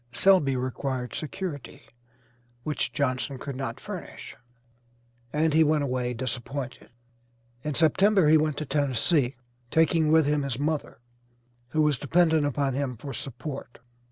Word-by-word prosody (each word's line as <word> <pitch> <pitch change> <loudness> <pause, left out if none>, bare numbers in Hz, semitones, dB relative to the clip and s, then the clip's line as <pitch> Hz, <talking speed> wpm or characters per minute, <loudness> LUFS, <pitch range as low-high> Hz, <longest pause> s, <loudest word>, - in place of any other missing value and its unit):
Selby 140 +1 +4
required 130 -1 -3
security, 155 -2 -5 0.8
which 150 +2 -1
Johnson 135 -1 -1
could 140 +1 -6
not 130 -3 -4
furnish, - - -8 1.0
and 155 +2 +1
he 160 +1 +6
went 150 -1 +2
away 125 -2 -1
disappointed. 130 +2 -5 0.7
In 150 -2 -2
September 190 +3 +4
he 155 - +6
went 155 -2 +2
to 155 - -3
Tennessee, 140 0 +1 0.3
taking 160 0 +3
with 160 -1 +5
him 150 0 +1
his 135 -4 -3
mother, 150 -3 -2 0.7
who 155 +5 +1
was 150 -3 +2
dependent 160 0 +3
upon 140 -1 0
him 130 -2 -2
for 140 +4 -7
support. 135 0 -7
145 Hz, 130 wpm, -27 LUFS, 130-155 Hz, 1.0 s, he